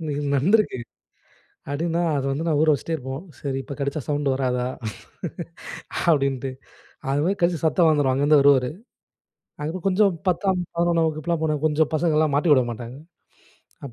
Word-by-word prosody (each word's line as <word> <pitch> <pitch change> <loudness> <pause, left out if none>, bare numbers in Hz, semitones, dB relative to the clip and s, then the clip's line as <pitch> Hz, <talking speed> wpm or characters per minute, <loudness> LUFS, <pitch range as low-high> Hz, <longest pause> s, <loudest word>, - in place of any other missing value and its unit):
இன்னைக்கு 145 -2 -3
நடந்திருக்கு. 195 +4 +2 0.9
அப்படின்னா, 165 +4 -1 0.2
அத 135 - -1
வந்து 140 +4 -2
நான் 155 -3 +2
ஊற 160 - +3
வச்சிட்டே 155 +3 -2
இருப்போம். 135 +1 -6 0.2
"சரி 135 -2 -3
இப்ப 140 - -7
கடீச்சா 140 +2 -2
சவுண்ட் 145 -1 0
வராதா?" 125 -2 0 1.4
அப்படின்ட்டு. 135 -4 +2 0.6
அது 140 +2 +1
மாரி 195 +3 +1
கடிச்சு 170 -1 +2
சத்தம் 160 +1 +4
வந்துரும். 145 -4 +2
அங்கிருந்து 145 +3 +4
வருவாரு. 135 -3 +4 0.9
அதுக்கப்புறம் 165 +5 -4
கொஞ்சம் 195 0 +3 0.2
10ஆம், 185 +1 +1 0.2
11ஆம் 170 -1 +2
வகுப்புல்லாம் 155 +1 -2
போனா, 155 -1 +1
கொஞ்சம் 155 0 +2
பசங்கள்லாம் 155 -2 +2
மாட்டிவுட 145 -4 +4
மாட்டாங்க. 120 +2 -7 0.9
அப்ப 135 - -8
150 Hz, 140 wpm, -23 LUFS, 140-165 Hz, 1.4 s, சத்தம்